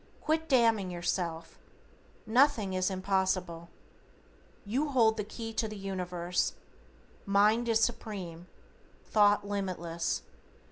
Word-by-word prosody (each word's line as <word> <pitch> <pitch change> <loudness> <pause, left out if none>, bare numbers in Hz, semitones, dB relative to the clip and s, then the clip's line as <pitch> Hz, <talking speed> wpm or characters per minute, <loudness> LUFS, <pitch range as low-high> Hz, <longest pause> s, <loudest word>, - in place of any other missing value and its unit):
Quit 320 +1 -1
damning 230 -7 +3
yourself. 175 -2 -3 0.7
Nothing 230 -4 +3
is 185 +1 +1
impossible. 185 -3 -1 1.0
You 265 +9 -1
hold 230 -5 +4
the 210 - -2
key 225 +2 -7
to 220 0 0
the 215 -1 -7
Universe. 180 -2 -2 0.7
Mind 210 +4 +3
is 225 -1 +3
Supreme. 190 -7 -3 0.6
Thought 205 -1 +3
limitless. 180 -4 -2
200 Hz, 100 wpm, -30 LUFS, 180-225 Hz, 1.0 s, hold